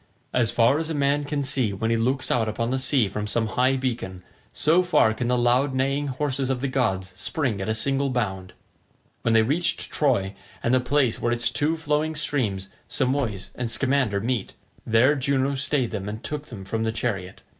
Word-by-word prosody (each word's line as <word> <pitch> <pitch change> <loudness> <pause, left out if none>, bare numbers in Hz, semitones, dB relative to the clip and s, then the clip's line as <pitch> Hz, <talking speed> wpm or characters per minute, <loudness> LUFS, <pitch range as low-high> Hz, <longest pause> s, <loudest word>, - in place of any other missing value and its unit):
As 120 -3 +2
far 120 +5 +3
as 160 0 -3
a 160 - -2
man 145 +1 +1
can 145 -1 -2
see 130 -6 +1
when 110 +4 -1
he - - +3
looks 130 +4 0
out 110 -2 +1
upon 115 +2 -2
the 130 - 0
sea 130 -4 +2
from 105 +2 -4
some 110 +1 0
high 130 +4 +2
beacon, 115 -8 -3 0.3
so 165 +4 +3
far 180 -11 +3
can 120 +2 -3
the 125 0 +2
loud 125 +3 +2
neighing 135 +2 0
horses 135 0 -2
of 130 -2 0
the 140 - -1
gods 95 -9 -1
spring 115 -1 -1
at 95 - -3
a 110 - +1
single 135 +4 +1
bound. 95 -7 -3 0.7
When 115 -1 +2
they 110 - +6
reached 150 +9 0
Troy 115 -10 +1 0.3
and 120 - +2
the 130 - +5
place 125 -1 +1
where 120 - +1
its 120 0 +1
two 150 +5 0
flowing 155 0 -1
streams 120 -11 -1 0.2
Simois 125 -7 -1
and 125 -2 -3
Scamander 125 -2 +1
meet, 115 -2 -2 0.3
there 115 +5 +5
Juno 140 0 0
stayed 140 -2 0
them 105 -2 -4
and 110 +2 -7
took 150 0 -5
them 100 -5 -9
from 110 +3 -2
the 110 0 0
chariot. 100 -5 -3
125 Hz, 200 wpm, -24 LUFS, 110-140 Hz, 0.7 s, they